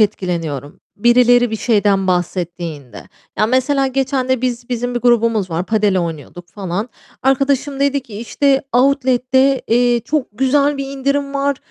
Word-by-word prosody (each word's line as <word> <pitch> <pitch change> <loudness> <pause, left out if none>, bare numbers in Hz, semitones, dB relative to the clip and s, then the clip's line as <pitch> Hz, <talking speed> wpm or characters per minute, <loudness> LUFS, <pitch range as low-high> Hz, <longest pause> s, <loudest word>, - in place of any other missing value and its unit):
etkileniyorum. 170 -9 -2 0.2
Birileri 245 +1 +4
bir 220 - -2
şeyden 205 -4 +1
bahsettiğinde. 170 - -4 0.3
Ya 215 - +3
mesela 265 +3 +1
geçende 260 -1 -1
biz 240 -1 -3
bizim 245 0 -3
bir 240 - -1
grubumuz 230 -5 +2
var, 165 +2 -2
Padel 210 -3 +1
oynuyorduk 170 +1 -6
falan. 195 +4 -4 0.3
Arkadaşım 275 +1 0
dedi 280 0 +1
ki, 230 - -13
işte, 270 +4 +1
outlet'te 260 +1 +2
eee, 240 +1 +2
çok 290 +3 -2
güzel 280 +5 +1
bir 275 0 -4
indirim 280 +1 -2
var, 280 0 0
245 Hz, 140 wpm, -17 LUFS, 195-270 Hz, 0.3 s, Birileri